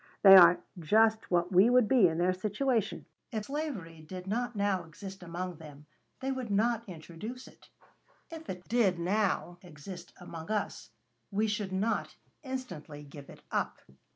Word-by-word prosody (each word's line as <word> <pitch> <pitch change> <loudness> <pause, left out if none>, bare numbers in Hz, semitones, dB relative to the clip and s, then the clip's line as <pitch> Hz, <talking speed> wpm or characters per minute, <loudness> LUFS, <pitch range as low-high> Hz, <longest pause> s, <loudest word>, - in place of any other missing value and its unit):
They 195 -1 +11
are 175 -1 +9 0.2
just 220 +6 +3
what 175 0 +1
we 190 +5 +6
would 250 -2 +5
be 235 -5 +5
in 160 -1 -2
their 180 +2 +2
situation. 215 +4 -1 0.3
If 215 -2 -3
slavery 250 - -5
did 180 +3 -8
not 240 +4 -2
now 200 -3 0
exist 190 +4 -10
among 180 0 -5
them, 150 -2 -12 0.4
they 265 +1 -1
would 260 -3 -4
not 225 +3 +1
introduce 180 +9 -8
it. - - -18 0.6
If 325 -1 -9
it 180 -1 -7
did 215 -6 +2
now 180 -1 0
exist 175 +1 -10
among 165 -2 -9
us, 215 -1 -3 0.4
we 210 +2 +1
should 210 -2 -2
not 200 +4 -1 0.3
instantly 250 - -7
give 140 -1 -12
it - - -14
up. - - -1
195 Hz, 155 wpm, -30 LUFS, 175-225 Hz, 0.6 s, They